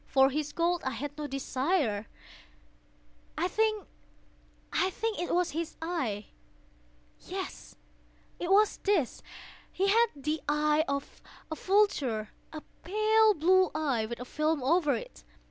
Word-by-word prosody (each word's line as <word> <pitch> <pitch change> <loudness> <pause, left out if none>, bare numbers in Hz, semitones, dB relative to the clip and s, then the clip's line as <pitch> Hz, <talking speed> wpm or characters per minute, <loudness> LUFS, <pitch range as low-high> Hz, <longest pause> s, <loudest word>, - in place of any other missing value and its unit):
For 270 0 +4
his 300 +1 -2
gold 345 +1 0
I 265 - -2
had 290 +1 -5
no 300 -1 -4
desire. 270 - -1 1.3
I 350 - +1
think 430 +1 0 0.9
it 380 0 -1
was 355 0 +1
his 330 +2 -4
eye! 270 - -3 0.9
yes, - - -7 0.6
it 350 - -3
was 420 +2 +4
this! 375 - 0 0.5
He 390 +1 +1
had 460 +3 +5
the 300 +2 -2
eye 300 +1 +2
of 280 0 -4 0.3
a - - -1
vulture—a 305 - 0 0.2
pale 430 +3 +4
blue 370 +4 +4
eye, 270 -8 0
with 235 +1 -6
a 250 - -6
film 305 +1 0
over 300 -1 +3
it. 220 - -8
310 Hz, 125 wpm, -30 LUFS, 275-370 Hz, 1.3 s, had